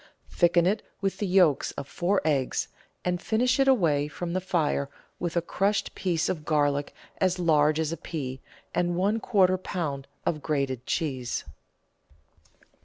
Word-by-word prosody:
Thicken 175 -1 +4
it 205 +4 +2 0.2
with 195 -1 -2
the 205 - -1
yolks 180 -6 +3
of 140 - -6
four 185 +6 0
eggs, 140 -4 +1 0.4
and 180 0 0
finish 250 +4 +1
it 270 - +4
away 160 - +3
from 170 +3 -5
the 185 - 0
fire 155 -6 0 0.3
with 175 -1 -2
a 170 - +2
crushed 200 +3 0
piece 175 -3 0
of 155 -4 -2
garlic 145 -2 +1 0.2
as 185 -1 +2
large 155 -3 +3
as 160 -1 0
a 165 - -3
pea, 130 -5 -5 0.3
and 175 0 +1
one 200 +5 +1
quarter 185 -5 +3
lb. 150 -8 -3 0.2
of 155 -3 0
grated 135 -4 -2
cheese. 130 -7 -2
170 Hz, 155 wpm, -27 LUFS, 145-185 Hz, 0.4 s, Thicken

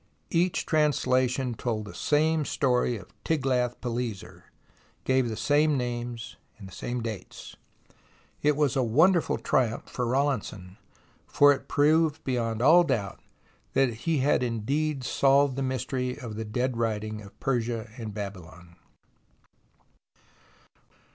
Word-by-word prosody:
Each 175 +1 +1
translation 130 -4 +1
told 110 -2 -3
the 105 - -9
same 155 +1 +1
story 125 -4 +1
of 95 - -14
Tiglath 130 -5 0
pileser, 120 -5 -5 0.6
gave 130 -2 +2
the 110 - -4
same 145 +5 +2
names 120 -2 -4 0.2
and 95 -2 -11 0.3
dates! 110 -4 -7 0.9
It 150 0 +3
was 145 -2 +1
a 135 - +2
wonderful 160 +10 +3
triumph 115 -3 0
for 125 -2 -3
Rawlinson, 115 -8 -2 0.5
for 145 0 +5
it 140 - -8
proved 155 +1 +2
beyond 115 -3 -1
all 170 +6 +7
doubt 115 - -2 0.5
that 135 -3 +2
he 155 +8 -1
had 140 0 +2
indeed 135 +5 -1
solved 135 +1 +3
the 135 - -3
mystery 130 0 -2
of 120 -7 -7
the 110 +1 -4
dead 125 +3 -2
writing 110 -2 -2
of 100 -2 -14
Persia 120 -3 -2
and 115 -4 -6
Babylon. 90 -4 -9
125 Hz, 120 wpm, -27 LUFS, 110-145 Hz, 0.9 s, all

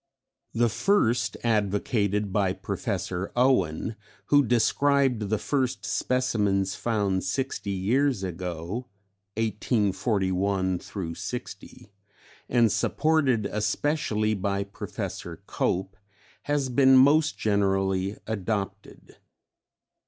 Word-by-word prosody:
The 120 +1 +3
first, 120 - +1
advocated 105 -2 0
by 95 -3 +2
Professor 95 0 -3
Owen, 110 -6 +1 0.3
who 145 -1 +6
described 125 -1 +2
the 110 - +1
first 125 +1 -1
specimens 100 -3 0
found 100 -5 -1
sixty 105 +2 -3
years 105 +5 +1
ago 90 +5 -5 0.5
(1841 100 -4 0 0.3
60) 100 - -8 0.6
and 120 -3 +4
supported 130 +1 +1
especially 110 0 0
by 100 0 -1
Professor 100 - -7
Cope, 95 +2 -1 0.5
has 145 -3 +1
been 130 +1 +5
most 150 +4 +4
generally 95 -1 0
adopted. 105 -1 -4
105 Hz, 85 wpm, -26 LUFS, 95-125 Hz, 0.6 s, who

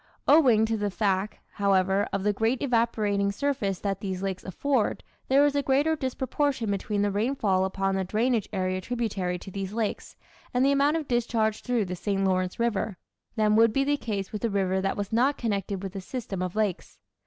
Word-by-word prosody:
Owing 255 -8 +6
to 225 0 -1
the 205 -1 -1
fact, 195 0 -1
however, 195 0 +2
of 195 -1 -2
the 210 0 +2
great 225 +5 0
evaporating 215 -5 +1
surface 210 -5 -1
that 195 -2 -2
these 190 -2 -4
lakes 190 -1 -3
afford, 245 +5 -1 0.2
there 275 +2 +5
is 290 - +2
a 285 - +2
greater 280 +4 +2
disproportion 265 -3 -1
between 200 +1 -1
the 205 - +1
rainfall 205 -3 +1
upon 195 0 -1
the 190 0 0
drainage 220 +3 0
area 185 -2 -1
tributary 200 -6 -2
to 190 - -10
these 195 +1 -5
lakes, 220 -2 -3 0.4
and 250 +2 +4
the 275 - +4
amount 285 +3 +3
of 310 -3 -4
discharge 230 -3 0
through 245 -4 0
the 180 0 -4
St. 195 +1 -1
Lawrence 185 0 0
River, 220 -4 -1 0.4
than 215 -1 +3
would 225 0 +5
be 275 +4 +1
the 290 +1 +2
case 205 -8 -4
with 210 - -5
a 230 - +2
river 190 -2 0
that 195 0 -1
was 205 +1 -4
not 260 +5 +3
connected 200 -4 -2
with 195 0 -6
a 195 - -4
system 205 -3 -5
of 185 +1 -3
lakes. 210 -4 -2
210 Hz, 200 wpm, -27 LUFS, 195-245 Hz, 0.4 s, Owing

